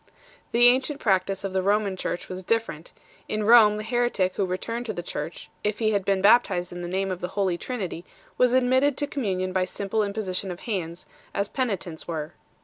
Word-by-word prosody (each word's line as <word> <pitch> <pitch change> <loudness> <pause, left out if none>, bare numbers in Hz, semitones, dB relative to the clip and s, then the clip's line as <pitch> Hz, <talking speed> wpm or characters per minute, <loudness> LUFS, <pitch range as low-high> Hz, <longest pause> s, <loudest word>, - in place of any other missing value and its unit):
The 240 +1 +5
ancient 260 +4 +3
practice 195 -2 +1
of 195 -1 -3
the 190 - +1
Roman 200 0 +1
Church 175 - -4
was 185 0 -6
different; 205 -6 -2 0.4
in 215 0 -1
Rome 215 -1 +7
the 215 - -4
heretic 225 -5 0
who 195 - 0
returned 230 +7 -3
to 215 - -2
the 175 - -5
Church, 160 0 -6 0.2
if 210 0 0
he 220 -2 +1
had 200 -2 +1
been 195 -1 +1
baptized 200 -5 +4
in 175 0 -6
the 175 - -4
name 190 +2 -1
of 180 - -5
the 180 - -2
Holy 190 -3 +2
Trinity, 185 -5 -5 0.3
was 250 0 +3
admitted 260 +2 +3
to 290 - 0
communion 190 -10 -2
by 185 -1 +2
simple 200 +3 -2
imposition 200 -2 -2
of 175 -1 -6
hands 175 -6 -4 0.3
5, - - 0
as 200 - -1
penitents 195 -10 -3
were. 155 -2 -4
200 Hz, 205 wpm, -25 LUFS, 185-230 Hz, 0.4 s, Rome